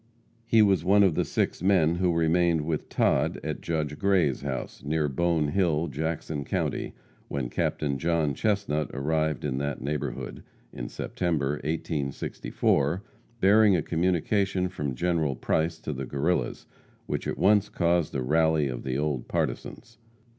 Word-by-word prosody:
He 110 Hz, -1 st, +6 dB
was 95 Hz, -5 st, +3 dB
one 100 Hz, +3 st, +5 dB
of 95 Hz, -4 st, +4 dB
the -, -, +1 dB
six -, -, -1 dB
men 85 Hz, -4 st, +3 dB
who 90 Hz, -1 st, +2 dB
remained 85 Hz, 0 st, +2 dB
with 75 Hz, 0 st, -3 dB
Todd -, -, +1 dB
at -, -, -4 dB
Judge 75 Hz, -3 st, -2 dB
Gray's 95 Hz, -9 st, +2 dB
house, 65 Hz, -3 st, -5 dB
near 75 Hz, +1 st, 0 dB
Bone 80 Hz, +1 st, +1 dB
Hill, 85 Hz, -2 st, +1 dB
Jackson 80 Hz, 0 st, -3 dB
county, -, -, -2 dB, 0.3 s
when 60 Hz, -4 st, -3 dB
Captain 70 Hz, -3 st, -1 dB
John 80 Hz, -3 st, +1 dB
Chestnut 100 Hz, -7 st, 0 dB
arrived 80 Hz, +2 st, 0 dB
in 65 Hz, -2 st, -1 dB
that 70 Hz, 0 st, -2 dB
neighborhood, 75 Hz, +1 st, -4 dB, 0.3 s
in -, -, -6 dB
September, 75 Hz, -5 st, -1 dB
1864, 75 Hz, +1 st, -1 dB, 0.4 s
bearing 105 Hz, +1 st, +6 dB
a -, -, 0 dB
communication 90 Hz, +2 st, +1 dB
from 75 Hz, -7 st, -4 dB
General 80 Hz, -2 st, 0 dB
Price 80 Hz, +6 st, 0 dB
to 75 Hz, -, -4 dB
the 65 Hz, -1 st, -5 dB
Guerrillas, 75 Hz, +7 st, -1 dB, 0.4 s
which -, -, -3 dB
at -, -, -2 dB
once 105 Hz, 0 st, +4 dB
caused 85 Hz, -3 st, +1 dB
a 65 Hz, -, 0 dB
rally 80 Hz, +1 st, +2 dB
of 60 Hz, -2 st, -4 dB
the 65 Hz, 0 st, -2 dB
old 75 Hz, -4 st, -2 dB
partisans. 115 Hz, -1 st, -4 dB
80 Hz, 145 wpm, -27 LUFS, 70-90 Hz, 0.4 s, He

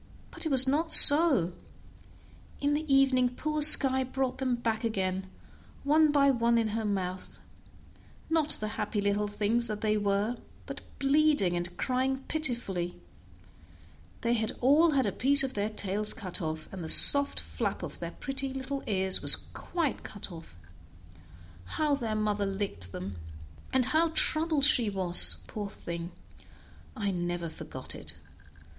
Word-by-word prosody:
But -, -, -6 dB
it -, -, -4 dB
was 265 Hz, -2 st, +3 dB
not 315 Hz, +5 st, -2 dB
so; 285 Hz, -, +8 dB, 1.1 s
in 285 Hz, +1 st, -2 dB
the 300 Hz, 0 st, -4 dB
evening 265 Hz, -2 st, +1 dB
poor 305 Hz, +2 st, -4 dB
Skye 270 Hz, -3 st, +9 dB
brought 260 Hz, 0 st, -5 dB
them 255 Hz, -2 st, -2 dB
back 230 Hz, -1 st, -5 dB
again, 190 Hz, -4 st, -4 dB, 0.6 s
one 305 Hz, +1 st, +1 dB
by 280 Hz, -1 st, +2 dB
one 235 Hz, -2 st, -1 dB
in 225 Hz, -1 st, -2 dB
her 220 Hz, +1 st, -5 dB
mouth; 185 Hz, -2 st, -6 dB, 0.9 s
not 320 Hz, -2 st, -2 dB
the 215 Hz, -, -6 dB
happy 210 Hz, -, -4 dB
little 205 Hz, +1 st, -2 dB
things 215 Hz, +3 st, -2 dB
that 215 Hz, -1 st, -7 dB
they 215 Hz, -1 st, -1 dB
were, 205 Hz, +3 st, -3 dB, 0.3 s
but -, -, -10 dB, 0.2 s
bleeding 280 Hz, -10 st, 0 dB
and 175 Hz, 0 st, -6 dB
crying 260 Hz, +1 st, -3 dB
pitifully; 235 Hz, -, -1 dB, 1.2 s
they 235 Hz, 0 st, -2 dB
had 220 Hz, -2 st, -3 dB
all 295 Hz, +7 st, +2 dB
had 270 Hz, -2 st, 0 dB
a 200 Hz, -, -2 dB
piece 275 Hz, +6 st, +4 dB
of 265 Hz, -1 st, -4 dB
their 205 Hz, +1 st, -4 dB
tails 210 Hz, 0 st, -1 dB
cut 185 Hz, -5 st, -3 dB
off, 155 Hz, -1 st, -7 dB
and 185 Hz, -3 st, -8 dB
the 160 Hz, -, -2 dB
soft 280 Hz, 0 st, +6 dB
flap -, -, -6 dB
of -, -, -9 dB
their -, -, -7 dB
pretty 270 Hz, -1 st, -7 dB
little 270 Hz, +1 st, -6 dB
ears 190 Hz, -2 st, -2 dB
was -, -, +8 dB, 0.2 s
cut 335 Hz, -6 st, -5 dB
quite 205 Hz, -2 st, -8 dB
off. 165 Hz, -, -14 dB, 1.2 s
How 305 Hz, -2 st, -1 dB
their 230 Hz, -6 st, -4 dB
mother 210 Hz, -1 st, -3 dB
licked 195 Hz, -, -6 dB
them, 90 Hz, 0 st, -9 dB, 0.5 s
and 260 Hz, -2 st, +1 dB
how 315 Hz, +5 st, 0 dB
troubled 310 Hz, -2 st, +2 dB
she 250 Hz, -7 st, +2 dB
was, 185 Hz, -3 st, +4 dB
poor 205 Hz, -2 st, -8 dB
thing! 170 Hz, -2 st, -9 dB, 0.9 s
I 200 Hz, -2 st, -3 dB
never 175 Hz, -2 st, -5 dB
forgot -, -, -11 dB
it. -, -, -9 dB
230 Hz, 150 wpm, -27 LUFS, 195-275 Hz, 1.2 s, Skye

